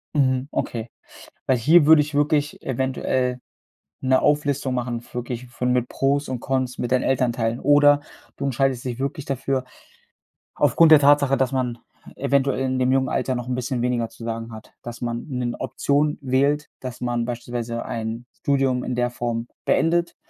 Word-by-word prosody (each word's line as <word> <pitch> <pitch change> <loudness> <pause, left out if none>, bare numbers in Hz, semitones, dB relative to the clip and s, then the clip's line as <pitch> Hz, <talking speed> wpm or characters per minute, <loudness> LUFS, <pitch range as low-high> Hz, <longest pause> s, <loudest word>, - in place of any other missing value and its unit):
Mhm. 130 -2 +2
Okay. 115 0 -3 0.6
Weil 130 - +3
hier 150 +6 +5
würde 160 -1 +8
ich 150 0 -7
wirklich 150 0 +1
eventuell 130 -1 -1 0.6
'ne 130 0 +3
Auflistung 145 -3 +1
machen, 120 -1 -3
wirklich 125 0 -5
von 125 +1 -2
mit 125 -1 0
Pros 140 +1 0
und 130 -2 -3
Cons, 130 -2 -2
mit 120 0 -2
deinen 130 - +3
Elternteilen 120 -3 0
oder 145 0 +5 0.4
du 140 - -5
entscheidest 135 -1 0
dich 125 -1 -4
wirklich 140 +2 -3
dafür 135 -1 -2 0.9
aufgrund 165 -1 +4
der 155 - +10
Tatsache, 140 -1 +4
dass 130 -1 +1
man 125 -3 -2 0.4
eventuell 140 -1 +1
in 130 0 -1
dem 130 0 +2
jungen 135 0 +2
Alter 130 - -1
noch 125 0 -5
'n 125 - 0
bisschen 125 -1 -2
weniger 120 -2 0
zu 115 - -13
sagen 115 0 -4
hat. 110 - -12
Dass 120 0 -8
man 120 -1 -3
'ne 125 -4 -3
Option 145 +1 0
wählt, 140 +3 +1
dass 130 -1 -7
man 120 -1 -1
beispielsweise 120 -1 -4
ein 115 +1 -4
Studium 135 -3 0
in 125 - -3
der 120 0 +1
Form 120 -1 -3 0.2
beendet 170 +1 +1
130 Hz, 170 wpm, -23 LUFS, 120-140 Hz, 0.9 s, der